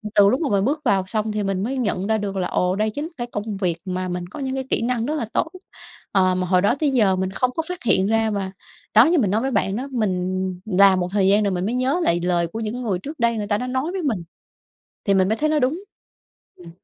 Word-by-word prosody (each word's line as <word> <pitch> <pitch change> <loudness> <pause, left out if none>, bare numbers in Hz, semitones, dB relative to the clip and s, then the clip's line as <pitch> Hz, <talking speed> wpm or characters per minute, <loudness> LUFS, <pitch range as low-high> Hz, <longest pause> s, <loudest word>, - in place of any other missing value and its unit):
từ 200 -1 +7
lúc 255 +8 +1
mà 290 - 0
mình 200 0 +2
bước 295 +4 0
vào 195 -4 +3
xong 215 +1 -1
thì 210 -1 -2
mình 195 -1 -1
mới 265 +5 -2
nhận 200 -6 -1
ra 220 0 +2
được 200 -2 -4
là, 180 - 0
ồ, 180 +1 0
đây 215 +2 +1
chính 290 +9 -5
cái 240 - -4
công 205 0 -4
việc 180 -4 -1
mà 185 0 -3
mình 180 -1 -4
có - - -9
những 265 -1 -2
cái 265 - -3
kỹ - - +2
năng 235 -1 0
rất 300 - -1
là 270 -7 -2
tốt, - - +1 0.6
ờ, 185 -2 +3
mà 185 0 -1
hồi 180 0 +3
đó 205 +5 +3
tới 295 -3 +2
giờ 210 -7 +3
mình 190 0 -2
không 255 +5 0
có 325 - -1
phát 360 - -6
hiện 190 -2 +3
ra 225 0 +2
mà 195 -2 -3 0.4
đó, 225 +4 +8
như 335 +1 +3
mình 200 -7 +1
nói 220 +2 +1
với 270 - -1
bạn 195 -5 0
đó, 260 +5 -3
mình 185 -4 -1 0.2
làm 195 -2 +5
một 180 - -1
thời 195 -2 +2
gian 205 +2 +4
rồi 200 - +1
mình 180 0 -1
mới 230 +4 -1
nhớ 260 +7 +1
lại 170 - +2
lời 175 -1 +1
của 220 - -6
những 215 +1 -3
cái 250 - -5
người 195 -7 -1
trước 295 +8 -8
đây 235 -1 +2
người 205 -1 -3
ta 205 - +1
đã 250 +3 -4
nói 260 +7 -1
với 380 - -3
mình, 225 - -1 0.8
thì 200 - +2
mình 190 0 +3
mới 220 - +1
thấy 305 +4 0
nó 310 - +2
đúng. 295 +8 0 0.7
Ừm. 175 -2 -12
210 Hz, 285 wpm, -22 LUFS, 190-255 Hz, 0.8 s, đó